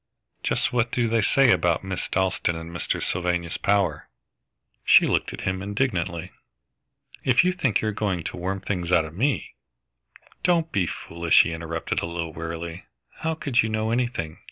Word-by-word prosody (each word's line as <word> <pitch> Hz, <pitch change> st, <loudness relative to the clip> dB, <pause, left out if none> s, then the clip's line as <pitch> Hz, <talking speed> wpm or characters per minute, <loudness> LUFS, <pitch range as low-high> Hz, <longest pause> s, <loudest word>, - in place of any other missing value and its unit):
"Just -, -, 0 dB
what 120 Hz, -1 st, +1 dB
do 120 Hz, -2 st, +1 dB
they 115 Hz, 0 st, +2 dB
say 130 Hz, +5 st, +4 dB
about 85 Hz, -4 st, +2 dB
Miss 95 Hz, -1 st, -3 dB
Dalstan 95 Hz, -2 st, 0 dB
and 80 Hz, +1 st, -7 dB
Mr. 85 Hz, -, -2 dB
Sylvanus 90 Hz, -1 st, -1 dB
Power?" 100 Hz, -1 st, 0 dB, 0.7 s
She -, -, +7 dB
looked -, -, 0 dB
at -, -, -7 dB
him 95 Hz, 0 st, -2 dB
indignantly. 100 Hz, -5 st, -2 dB, 0.9 s
"If 130 Hz, +3 st, +4 dB
you 180 Hz, +1 st, +2 dB
think 145 Hz, -, +1 dB
you're 110 Hz, -, 0 dB
going 100 Hz, -5 st, -2 dB
to -, -, -5 dB
worm 95 Hz, +2 st, -3 dB
things 90 Hz, -3 st, -3 dB
out 85 Hz, -3 st, +4 dB
of 80 Hz, -, -9 dB
me 130 Hz, -, -1 dB, 0.4 s
" -, -, -27 dB
"Don't 170 Hz, -2 st, +2 dB
be 95 Hz, -4 st, +1 dB
foolish," 85 Hz, -1 st, +2 dB
he 85 Hz, -, -3 dB
interrupted, 85 Hz, 0 st, -3 dB
a -, -, -3 dB
little 85 Hz, -1 st, -4 dB
wearily. 85 Hz, +1 st, -6 dB, 0.3 s
"How 160 Hz, 0 st, -2 dB
could 140 Hz, -6 st, +1 dB
you 110 Hz, -, -1 dB
know 110 Hz, 0 st, -1 dB
anything? 115 Hz, -10 st, -2 dB
95 Hz, 175 wpm, -25 LUFS, 85-115 Hz, 0.9 s, She